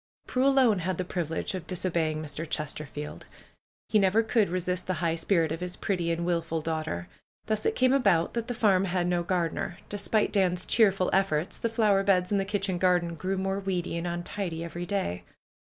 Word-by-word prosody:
Prue 260 Hz, +2 st, +1 dB
alone 260 Hz, -7 st, +4 dB
had 180 Hz, 0 st, -2 dB
the 185 Hz, -, -2 dB
privilege 170 Hz, 0 st, -3 dB
of 185 Hz, -3 st, -5 dB
disobeying 165 Hz, -4 st, -1 dB
Mr. 155 Hz, +1 st, -5 dB
Chesterfield. 150 Hz, -1 st, -5 dB, 0.6 s
He 215 Hz, -, +3 dB
never 200 Hz, +3 st, +3 dB
could 225 Hz, -2 st, +2 dB
resist 180 Hz, 0 st, -2 dB
the 185 Hz, -, 0 dB
high 165 Hz, 0 st, 0 dB
spirit 165 Hz, -1 st, +1 dB
of 160 Hz, -, -3 dB
his 180 Hz, 0 st, -4 dB
pretty 180 Hz, -5 st, -1 dB
and 170 Hz, +1 st, -1 dB
wilful 165 Hz, -2 st, -1 dB
daughter. 155 Hz, -, -3 dB, 0.4 s
Thus 215 Hz, 0 st, 0 dB
it -, -, 0 dB
came 255 Hz, 0 st, +3 dB
about 200 Hz, -11 st, +3 dB
that 235 Hz, -1 st, -2 dB
the 245 Hz, -, -3 dB
farm 195 Hz, -4 st, +3 dB
had 180 Hz, -1 st, 0 dB
no 175 Hz, 0 st, +1 dB
gardener. 175 Hz, -1 st, -1 dB
Despite 205 Hz, +1 st, 0 dB
Dan's 185 Hz, -3 st, +2 dB
cheerful 195 Hz, -5 st, +3 dB
efforts 185 Hz, -2 st, +1 dB
the 230 Hz, -, 0 dB
flower 215 Hz, -4 st, +3 dB
beds 190 Hz, -2 st, +2 dB
and 200 Hz, -1 st, +2 dB
the -, -, -2 dB
kitchen 195 Hz, -2 st, -1 dB
garden 175 Hz, -2 st, +2 dB
grew 185 Hz, +4 st, -2 dB
more 195 Hz, +1 st, -1 dB
weedy 185 Hz, -3 st, -2 dB
and 170 Hz, +1 st, -2 dB
untidy 175 Hz, 0 st, -3 dB
every 175 Hz, +1 st, -5 dB
day. 190 Hz, -, -2 dB
180 Hz, 190 wpm, -28 LUFS, 165-200 Hz, 0.6 s, alone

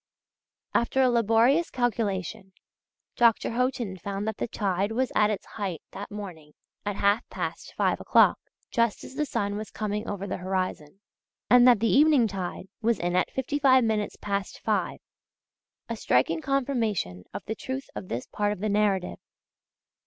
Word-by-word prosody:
After 265 Hz, +3 st, +2 dB
a 255 Hz, -, +4 dB
laborious 235 Hz, +8 st, +3 dB
calculation, 200 Hz, -6 st, -2 dB, 0.6 s
Dr. 235 Hz, -1 st, +3 dB
Haughton 245 Hz, -5 st, -1 dB
found 200 Hz, +3 st, -4 dB
that 220 Hz, -, -2 dB
the -, -, -2 dB
tide 200 Hz, -1 st, -1 dB
was 255 Hz, +1 st, 0 dB
at 210 Hz, 0 st, +4 dB
its 210 Hz, -3 st, -3 dB
height 195 Hz, -7 st, -5 dB
that 200 Hz, +1 st, -7 dB
morning 180 Hz, -8 st, -8 dB, 0.3 s
at 205 Hz, -, -1 dB
half 200 Hz, +3 st, +1 dB
past -, -, -5 dB
five -, -, +1 dB
o'clock, -, -, +4 dB, 0.3 s
just 230 Hz, -2 st, +1 dB
as -, -, -10 dB
the 300 Hz, +2 st, -1 dB
sun 205 Hz, -5 st, -1 dB
was 215 Hz, 0 st, -6 dB
coming 210 Hz, 0 st, -3 dB
over 200 Hz, -1 st, -4 dB
the -, -, -3 dB
horizon, 185 Hz, -2 st, -3 dB, 0.5 s
and 250 Hz, 0 st, +8 dB
that 240 Hz, -4 st, +6 dB
the 230 Hz, -, +3 dB
evening 290 Hz, -4 st, +5 dB
tide 185 Hz, -2 st, -5 dB, 0.2 s
was 230 Hz, 0 st, +2 dB
in 175 Hz, +1 st, -1 dB
at 185 Hz, -, +2 dB
fifty 265 Hz, +2 st, -2 dB
five 260 Hz, -2 st, +5 dB
minutes 215 Hz, -2 st, 0 dB
past 200 Hz, -1 st, -3 dB
five: -, -, 0 dB, 0.9 s
a 230 Hz, -, -3 dB
striking 160 Hz, -, +1 dB
confirmation 225 Hz, -, -1 dB
of -, -, -7 dB
the 220 Hz, -, -2 dB
truth 260 Hz, +4 st, -5 dB
of -, -, -7 dB
this 120 Hz, -4 st, -4 dB
part 205 Hz, 0 st, -1 dB
of 210 Hz, -, -4 dB
the 215 Hz, +2 st, -1 dB
narrative. 200 Hz, -3 st, +1 dB
210 Hz, 165 wpm, -27 LUFS, 195-240 Hz, 0.9 s, and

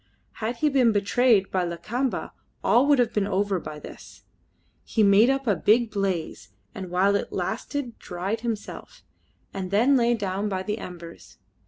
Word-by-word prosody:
Had 225 Hz, +3 st, -2 dB
he 300 Hz, +6 st, +1 dB
been 260 Hz, -5 st, +3 dB
betrayed 210 Hz, 0 st, +2 dB
by 185 Hz, -1 st, +1 dB
Lakamba 215 Hz, +10 st, -3 dB, 0.3 s
all 255 Hz, +4 st, +4 dB
would 290 Hz, -1 st, +5 dB
have 240 Hz, -2 st, +1 dB
been 205 Hz, -2 st, 0 dB
over 200 Hz, -1 st, 0 dB
by 155 Hz, -2 st, -8 dB
this. -, -, -12 dB, 0.6 s
He 220 Hz, -, +1 dB
made 205 Hz, +4 st, +6 dB
up 270 Hz, 0 st, 0 dB
a 210 Hz, -4 st, +2 dB
big 220 Hz, +6 st, +2 dB
blaze, 190 Hz, -5 st, -3 dB, 0.2 s
and 190 Hz, -5 st, -7 dB
while 190 Hz, +3 st, +2 dB
it 200 Hz, -, -2 dB
lasted 275 Hz, -6 st, -4 dB
dried 190 Hz, +5 st, -4 dB
himself, 230 Hz, -3 st, -6 dB, 0.5 s
and 190 Hz, -2 st, -4 dB
then 235 Hz, +8 st, +3 dB
lay 240 Hz, -1 st, +3 dB
down 200 Hz, -1 st, -2 dB
by 190 Hz, -1 st, -2 dB
the 210 Hz, +2 st, -3 dB
embers. 170 Hz, -2 st, -10 dB
210 Hz, 165 wpm, -25 LUFS, 190-240 Hz, 0.6 s, made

